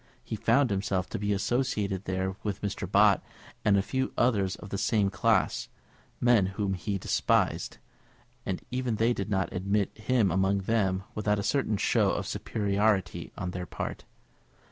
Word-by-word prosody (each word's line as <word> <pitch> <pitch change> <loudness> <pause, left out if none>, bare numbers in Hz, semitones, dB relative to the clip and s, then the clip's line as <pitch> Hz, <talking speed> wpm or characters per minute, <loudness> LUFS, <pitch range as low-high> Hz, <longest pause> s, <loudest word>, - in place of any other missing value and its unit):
He - - -4
found 140 -5 +3
himself 95 -2 -1
to - - -4
be 105 0 -1
associated 100 -2 0
there 95 0 -2
with 105 -1 -4
Mr. 100 -2 -3
Bott, 100 -1 +5 0.4
and 100 -1 +4
a 95 - +2
few 130 +4 -2
others 100 -6 +2
of 105 - -11
the 100 - -1
same 105 -4 +2
class, 110 -1 +1 0.5
men 120 -6 +4
whom 100 0 -2
he 100 +2 -2
despised; - - +1 0.7
and - - -3
even 125 -2 -1
they 115 +3 +2
did 100 -2 -4
not 95 -2 0
admit 100 +2 0
him 110 -3 +1
among 95 +2 +2
them 95 -2 0
without 105 -1 0
a 100 - -2
certain 110 -1 +1
show - - +2
of - - -2
superiority 100 -2 0
on 90 - -3
their 90 -1 -5
part. - - -5
100 Hz, 165 wpm, -28 LUFS, 95-110 Hz, 0.7 s, Bott